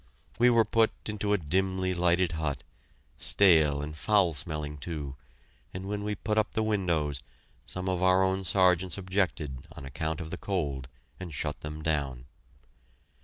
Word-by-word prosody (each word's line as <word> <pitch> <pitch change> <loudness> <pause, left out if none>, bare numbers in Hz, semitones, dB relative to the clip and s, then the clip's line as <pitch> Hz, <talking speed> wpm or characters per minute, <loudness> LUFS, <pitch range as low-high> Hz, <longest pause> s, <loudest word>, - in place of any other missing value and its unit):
We 120 +1 +6
were 115 -2 +5
put 110 +1 +3 0.2
into 105 -1 -1
a 105 - +4
dimly 95 +3 0
lighted 90 0 +2
hut, 80 -3 -2 0.6
stale 80 -7 +4
and 75 +1 -6
foul 95 +1 +3
smelling, 75 +1 -3
too, 75 -4 -5 0.6
and 95 +1 -5
when 105 0 -3
we 105 0 -2
put 110 +1 0
up 105 - -1
the 110 - +1
windows, 85 -10 0 0.5
some 90 0 -3
of 90 -1 0
our 95 0 +5
own 95 0 0
Sergeants 90 -1 +3
objected 90 -8 -2
on 70 - -9
account 80 +4 -3
of 80 -2 -6
the - - -5
cold, 70 -10 -2 0.3
and 90 -3 -6
shut 75 - -3
them 75 0 -6
down. 70 -6 -1
90 Hz, 160 wpm, -29 LUFS, 75-95 Hz, 0.6 s, We